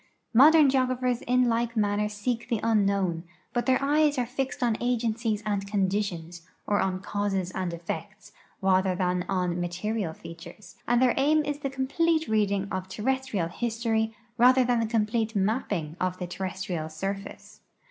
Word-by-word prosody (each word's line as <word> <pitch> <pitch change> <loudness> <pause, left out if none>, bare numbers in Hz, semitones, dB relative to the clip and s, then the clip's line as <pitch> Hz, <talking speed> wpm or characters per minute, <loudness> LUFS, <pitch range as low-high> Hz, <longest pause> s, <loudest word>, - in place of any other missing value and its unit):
Modern 300 +5 +7
geographers 255 -2 +1
in 250 0 +2
like 235 0 0
manner 210 0 +1
seek 230 +3 -3
the 230 - 0
unknown, 200 -6 +1 0.3
but 240 +1 -1
their 260 0 +4
eyes 295 0 +3
are 250 - +1
flxed 260 +1 -3
on 235 -2 +2
agencies 230 -3 0
and 200 -2 -1
conditions, 190 -4 -2 0.2
or 205 - +1
on 185 -1 -1
causes 195 -3 -2
and 185 -1 -3
effects, 185 +4 -7 0.3
rather 190 -1 +3
than 180 -1 0
on 180 -2 0
material 180 +1 -2
features, 170 +4 -12
and 240 +1 +3
their 250 - +4
aim 300 +2 +3
is 290 0 -3
the 275 - -3
com})lete 315 +5 0
reading 200 -2 +1
of 185 0 -3
terrestrial 230 -4 -1
history 225 +1 -1 0.2
rather 255 +2 +6
than 245 -1 +1
the 225 - 0
complete 220 0 0
mapping 195 - -1
of 185 0 0
the 180 - -4
terrestrial 180 -3 -4
surface. 195 +5 -6
215 Hz, 155 wpm, -27 LUFS, 190-245 Hz, 0.3 s, Modern